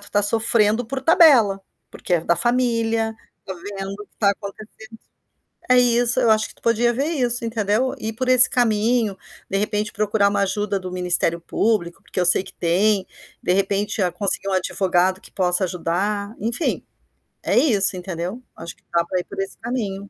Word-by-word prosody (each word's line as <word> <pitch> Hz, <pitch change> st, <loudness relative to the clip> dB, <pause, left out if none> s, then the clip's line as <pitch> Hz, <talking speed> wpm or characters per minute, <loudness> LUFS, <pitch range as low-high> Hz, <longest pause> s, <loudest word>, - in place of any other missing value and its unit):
tu 205 Hz, -, -12 dB
tá 205 Hz, -, +1 dB
sofrendo 225 Hz, +1 st, +1 dB
por 265 Hz, +4 st, -5 dB
tabela, 265 Hz, -, +5 dB, 0.3 s
porque 180 Hz, -, -2 dB
é 170 Hz, -, +1 dB
da 170 Hz, +1 st, +1 dB
familia, 230 Hz, -2 st, 0 dB, 0.3 s
tá 190 Hz, -, -5 dB
vendo 195 Hz, +2 st, -7 dB
o -, -, -9 dB
que -, -, -45 dB
está 200 Hz, -2 st, +2 dB
acontecendo, 200 Hz, +2 st, -8 dB, 0.9 s
é 250 Hz, -, +6 dB
isso, 240 Hz, -1 st, +2 dB
eu 230 Hz, -, +3 dB
acho 220 Hz, 0 st, +2 dB
que -, -, -14 dB
tu -, -, -27 dB
podia 235 Hz, +1 st, +2 dB
ver 275 Hz, +4 st, -1 dB
isso, 245 Hz, -7 st, -1 dB
entendeu. 225 Hz, +3 st, 0 dB
Ir 220 Hz, -, -4 dB
por 255 Hz, +3 st, -4 dB
esse 255 Hz, -1 st, +7 dB
caminho, 225 Hz, -3 st, +1 dB, 0.3 s
de 195 Hz, -, -1 dB
repente 210 Hz, +1 st, -1 dB
procurar 210 Hz, -1 st, +1 dB
uma 200 Hz, 0 st, 0 dB
ajuda 200 Hz, +1 st, -1 dB
do 185 Hz, -1 st, -7 dB
ministério 180 Hz, -2 st, 0 dB
público, 175 Hz, -1 st, -1 dB
porque -, -, -5 dB
eu 180 Hz, -, +2 dB
sei 180 Hz, +2 st, +3 dB
que -, -, -12 dB
tem, 190 Hz, +3 st, +1 dB, 0.3 s
de 180 Hz, -, +1 dB
repente, 200 Hz, +2 st, -1 dB
conseguir, 195 Hz, +2 st, -2 dB
ah, -, -, -2 dB
um -, -, 0 dB
advogado 185 Hz, 0 st, 0 dB
que -, -, -15 dB
possa 180 Hz, 0 st, +1 dB
ajudar, 200 Hz, +4 st, -2 dB
entim. 235 Hz, -, -2 dB, 0.6 s
E -, -, -2 dB, 0.2 s
Isso, 195 Hz, -2 st, +3 dB
entendeu. 180 Hz, +5 st, -5 dB
Acho 165 Hz, 0 st, -9 dB
que -, -, -33 dB
da 170 Hz, -, +3 dB
pra 185 Hz, +1 st, -2 dB
ir 180 Hz, -, -6 dB
por -, -, -11 dB
esse 195 Hz, -, -6 dB
caminho. 205 Hz, -5 st, -4 dB
205 Hz, 190 wpm, -21 LUFS, 190-230 Hz, 0.9 s, esse